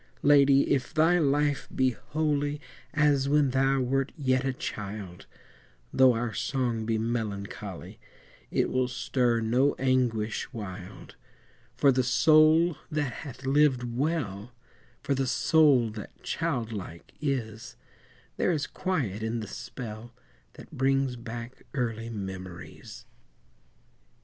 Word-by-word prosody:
Lady! 140 -1 +5
if 135 +3 0
thy 165 +3 +4
life 145 -1 +1
be 130 -1 +3
holy 145 +2 -2 0.3
As 145 -3 +2
when 145 -2 +3
thou 135 +1 +2
wert 135 +2 0
yet 130 -3 +1
a 135 - 0
child, 100 -6 -6 0.7
Though 130 -1 +6
our 115 -1 -2
song 120 -1 -1
be 115 -1 +1
melancholy, 110 -3 -4 0.5
It - - 0
will 130 0 +1
stir 120 -1 0
no 125 +6 +2
anguish 125 -4 0
wild; 100 -4 -9 0.6
For 140 - +5
the 130 0 +2
soul 155 +6 +4
that 150 -5 -1
hath 135 -2 -9
lived 135 -2 +3
well, 125 - -2 0.5
For 140 - 0
the 135 -1 0
soul 140 -7 +4
that 105 -1 -10
child 115 -2 -2
like 90 -5 -8
is, 115 -6 -3 0.6
There - - +2
is 150 -5 -1
quiet 135 - -2
in 110 +1 -2
the 110 - -6
spell 115 +1 -8 0.4
That - - -13
brings 135 -1 +1
back 120 +1 -8
early 115 -3 -2
memories. 95 -4 -8
130 Hz, 120 wpm, -28 LUFS, 115-140 Hz, 0.7 s, Though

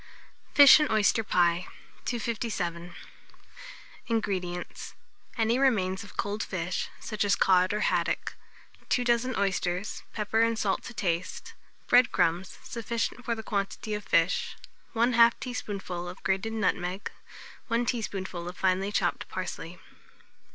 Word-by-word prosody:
FISH 285 +1 +10
AND 300 - +1
OYSTER 215 +1 +3
PIE. 175 -2 +2 0.4
257. 205 -8 -3 1.1
INGREDIENTS. 185 -6 -3 0.4
Any 230 +2 +2
remains 195 -9 +2
of 205 - -14
cold 205 +2 -2
fish, 180 -3 -3
such 215 -2 -2
as 200 0 +3
cod 185 -1 +4
or 210 0 -1
haddock; - - 0 0.6
2 250 - +2
dozen 240 +1 +1
oysters, 190 -1 -1
pepper 220 +1 0
and 230 0 +2
salt 200 -3 0
to 235 - -8
taste, 170 -4 -2 0.3
bread 245 -1 +5
crumbs 175 +3 0
sufficient 235 +1 -3
for 235 0 -1
the 220 - -7
quantity 200 +1 -3
of 210 0 -3
fish; 170 -1 +1 0.4
1/2 235 0 +5
teaspoonful 195 -8 -5
of 180 - -11
grated 195 +4 0
nutmeg, 190 -3 -1 0.6
1 235 +1 +1
teaspoonful 190 -7 -3
of 180 - -10
finely 190 +1 +1
chopped - - -1
parsley. - - -5
205 Hz, 125 wpm, -28 LUFS, 185-230 Hz, 1.1 s, FISH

